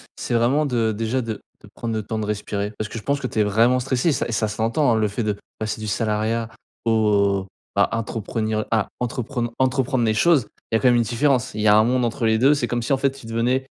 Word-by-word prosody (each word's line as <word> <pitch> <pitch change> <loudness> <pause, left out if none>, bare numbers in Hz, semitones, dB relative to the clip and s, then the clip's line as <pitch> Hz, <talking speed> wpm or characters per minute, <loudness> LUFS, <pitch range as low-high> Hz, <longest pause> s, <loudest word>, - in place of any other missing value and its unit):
c'est - - -4
vraiment 130 +6 +2
de 115 -4 +1
déjà 115 +4 -1
de 110 -3 -5 0.2
de - - -14
prendre 115 -1 -4
le 110 - -2
temps 110 +1 -4
de 110 - -2
respirer. 105 0 -3
Parce 110 - -3
que 115 - -6
je - - -14
pense 140 0 0
que 135 - -6
tu 120 - -2
es 105 - +5
vraiment 115 +5 +3
stressé 130 +5 0
et - - +4
ça - - -1
et 120 - -5
ça 110 0 0
s'entend, 115 +6 +1
hein, - - +2
le 110 -1 +2
fait 105 +3 -3
de 105 -1 -1 0.2
passer 110 0 -3
du 110 - -4
salariat 110 +2 -1 0.4
au 100 -3 +2 0.3
à - - +2
à - - -1
entreprenir 110 -1 -2
à 110 -3 +1
entrepren 125 0 -2
à 120 +3 -1
entreprendre 130 -1 +1
les 110 - +2
choses, 135 +1 +3 0.2
il - - +2
y - - +6
a - - -2
quand 130 - +4
même 120 - +4
une 120 - +4
différence. 125 +2 +1
Il 105 - -3
y 110 - +2
a 105 - +7
un 110 - +6
monde 125 +2 +1
entre 120 +1 -2
les 110 0 +3
2, 135 +5 +5
c'est 140 -5 -1
comme 120 -1 -2
si 135 - 0
en - - +3
fait 135 +1 +2
tu 135 -3 -13
devenais 120 +4 0
115 Hz, 280 wpm, -22 LUFS, 110-125 Hz, 0.4 s, a